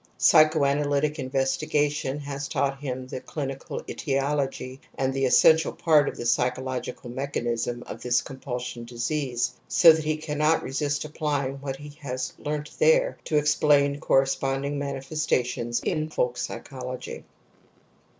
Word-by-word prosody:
Psychoanalytic 150 -1 +3
investigation 135 +1 0
has 140 0 -5
taught 135 0 -1
him 130 -2 -4
the 130 0 -6
clinical 135 -3 -5
etiology 135 -2 -2 0.2
and 135 0 0
the 135 0 +1
essential 160 +5 +5
part 150 -3 +4
of - - -9
the 120 - -5
psychological 125 0 -1
mechanism 120 -3 -2
of - - -8
this 120 -1 +2
compulsion 125 -3 -6
disease, 120 +1 -2
so 165 -2 +7
that 160 0 -2
he 155 0 0
cannot 155 +1 +1
resist 145 +2 -1
applying 145 -3 -2
what 135 -1 -4
he 145 +2 -10
has 130 -2 -4
learnt 150 0 -4
there - - +4
to 155 - +1
explain 145 -1 +3
corresponding 135 +1 +1
manifestations 135 -4 -1
in 155 -2 -1
folk 125 -5 0
psychology. 130 -1 -6
140 Hz, 125 wpm, -26 LUFS, 130-150 Hz, 0.2 s, so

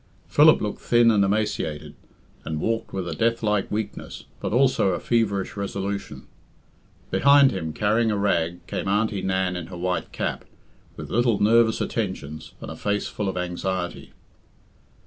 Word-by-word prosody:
Philip - - +6
looked - - -4
thin 120 -1 +4
and 105 -2 +3
emaciated, 95 -7 -1 0.5
and 80 -1 -3
walked 115 +6 -2
with 95 -2 -4
a 85 - -3
death 115 +6 0
like 105 -2 +1
weakness, 105 -1 -5 0.2
but - - -3
also 130 -2 +3
a - - -2
feverish 100 -5 0
resolution. 100 0 -4 0.9
Behind 140 -1 +6
him, 80 -8 -3
carrying 110 +6 +1
a 105 - 0
rag, 90 -3 0
came - - -4
Aunty 105 0 +1
Nan 95 -1 0
in 90 -2 -5
her 90 - -8
white 90 +1 -2
cap, - - -3 0.5
with - - -8
little 120 -2 +2
nervous 110 +1 +4
attentions, 85 -8 -4
and - - -7
a - - -7
face 105 0 -1
full 105 -2 -3
of 95 - -4
anxiety. 90 0 -3
100 Hz, 155 wpm, -24 LUFS, 90-110 Hz, 0.9 s, Philip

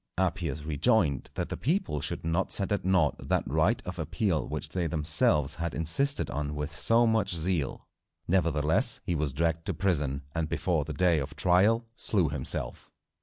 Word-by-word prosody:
Appius 85 -5 -2
rejoined, 80 - +1
that - - -3
the - - -4
people 160 - -1
should - - -3
not 85 +3 -1
set 100 +1 +1
at 100 - -1
nought 90 -6 +2
that - - -1
right 80 - +1
of 90 -1 -7
appeal 80 - -1
which - - -5
they 90 -2 -2
themselves 75 -2 +3
had 85 0 -4
insisted 85 - +2
on 75 +1 -4
with 75 +2 -5
so 115 +8 +5
much 110 -5 +1
zeal. 80 -3 -1 0.5
Nevertheless, 80 -4 +2
he 90 - -2
was 75 -3 -1
dragged 80 +3 -1
to 95 - -2
prison, 75 -6 -1
and 80 -2 -2
before 80 -4 -1
the 80 - -5
day 85 +1 +2
of 70 - -6
trial 105 +6 +2
slew 95 - +1
himself. 70 -3 -2
85 Hz, 170 wpm, -28 LUFS, 75-95 Hz, 0.5 s, so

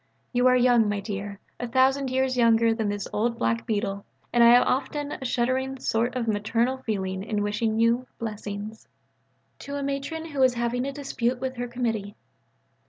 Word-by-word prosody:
You 245 +1 +4
are 255 - +5
young, 245 -3 +4
my 205 0 -1
dear: 200 0 -5 0.2
a 245 - -3
thousand 265 +2 +2
years 260 0 +1
younger 230 -1 +4
than 220 -2 -1
this 205 -1 -3
old 230 +2 0
black 230 0 -1
beetle. 200 -2 -2 0.3
And 240 -1 +5
I - - +8
have 245 +1 +7
often 290 +2 -1
a - - -6
shuddering 260 +2 0
sort 235 +1 0
of 240 -2 -2
maternal 230 +4 0
feeling 190 -6 -3
in 205 0 -2
wishing 215 +2 0
you 235 +2 +2
"blessings."... 210 -1 -6 0.7
(_To 280 0 -6
a - - -3
Matron 280 +4 -3
who 285 - -5
was 260 -2 +4
having 240 +2 -1
a - - -2
dispute 260 -3 -2
with 260 0 -4
her 245 0 -3
Committee. 225 -4 -3
235 Hz, 180 wpm, -26 LUFS, 215-255 Hz, 0.7 s, I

